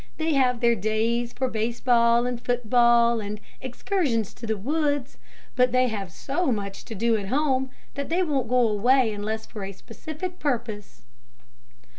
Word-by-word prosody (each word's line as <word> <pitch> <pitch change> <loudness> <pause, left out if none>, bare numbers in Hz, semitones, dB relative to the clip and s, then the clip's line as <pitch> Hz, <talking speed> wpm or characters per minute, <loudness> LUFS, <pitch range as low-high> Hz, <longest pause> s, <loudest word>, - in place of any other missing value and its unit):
They 320 -1 0
have 250 -3 +2
their 235 -1 +4
days 225 +3 0
for 260 +1 -2
base 230 0 -2
ball, 235 -1 +4
and 245 -1 -3
foot 245 -2 -1
ball, 235 -1 +5
and 210 0 -5 0.2
excursions 260 - -1
to 230 - -9
the 220 -1 0
woods, 285 +3 -1 0.4
but 250 -1 +3
they 255 0 +3
have 200 -5 -5
so 285 - -1
much 200 -3 -4
to 225 - -7
do 230 +3 +2
at 200 -2 -5
home, 265 +1 +1 0.2
that 280 0 -5
they 350 +3 +2
won't 275 -8 -1
go 250 -1 +4
away 225 +2 +3
unless 215 +2 -4
for 210 -3 -8
a 195 - -5
specific 315 - -7
purpose." 230 -7 -3
240 Hz, 170 wpm, -25 LUFS, 220-265 Hz, 0.4 s, ball